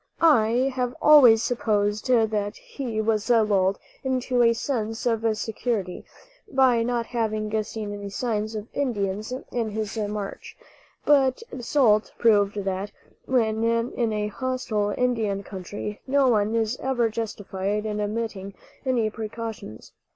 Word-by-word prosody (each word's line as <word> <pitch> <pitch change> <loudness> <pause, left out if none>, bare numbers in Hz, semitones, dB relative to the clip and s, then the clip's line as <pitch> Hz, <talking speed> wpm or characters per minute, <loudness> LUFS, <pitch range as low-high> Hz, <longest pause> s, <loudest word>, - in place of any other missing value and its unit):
I 255 -4 +4
have 250 -1 -2
always 250 -7 +7
supposed 210 -2 0
that 220 -4 +1
he 240 -6 -5
was 220 0 0
lulled 205 -5 +3 0.3
into 255 -1 0
a 230 -1 +6
sense 225 -2 -2
of 230 -2 +1
security 215 -4 -3 0.5
by 255 -3 +4
not 235 0 -1
having 215 -2 -1
seen 210 -1 -6
any 205 0 -6
signs 215 0 -2
of 210 0 -5
Indians 215 -5 -2 0.2
in 230 -3 -1
his 215 +1 -4
march; 205 -1 -5 0.5
but 275 - +3
the - - -7
result 235 -4 +2
proved 205 -3 +3
that, 195 +1 -2 0.4
when 225 -3 +1
in 230 0 0
a 210 -1 -1
hostile 245 -4 -2
Indian 220 -6 0
country, 200 +2 -7
no 275 0 +3
one 215 -1 +2
is 225 +2 0
ever 250 -3 +1
justified 205 -2 -3
in 210 -1 -2
omitting 205 -2 -4 0.3
any 250 -5 +1
precautions. 220 - -7
220 Hz, 130 wpm, -25 LUFS, 210-245 Hz, 0.5 s, always